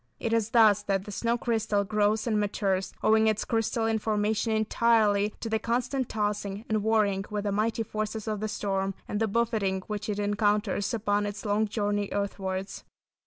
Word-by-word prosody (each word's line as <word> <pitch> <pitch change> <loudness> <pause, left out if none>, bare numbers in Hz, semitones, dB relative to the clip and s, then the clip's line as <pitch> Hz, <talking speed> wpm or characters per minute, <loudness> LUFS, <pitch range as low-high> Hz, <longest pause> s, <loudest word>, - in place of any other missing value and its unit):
It 225 - -1
is 225 -2 +1
thus 215 -3 +5
that 195 -1 -1
the 210 - -7
snow 235 +4 0
crystal 220 -3 0
grows 210 +1 +1
and 220 -3 +1
matures, 195 -2 -1
owing 220 0 +4
its 215 -1 +1
crystalline 225 0 0
formation 215 +1 0
entirely 215 -1 +2
to - - -3
the 220 0 0
constant 245 +3 -1
tossing 205 0 -2
and 215 -1 0
warring 205 -3 +1
with 210 -1 -3
the 205 - -1
mighty 220 +3 0
forces 215 0 -4
of 215 -1 -2
the 215 - -2
storm, 195 -2 -2
and 205 - -2
the 225 - +1
buffeting 210 -4 0
which 210 +2 -5
it 205 - -1
encounters 205 0 0
upon 205 -1 0
its 205 +2 -6
long 210 +1 +1
journey 205 -1 -1
earthwards. 195 -1 -3
210 Hz, 175 wpm, -28 LUFS, 205-220 Hz, -, thus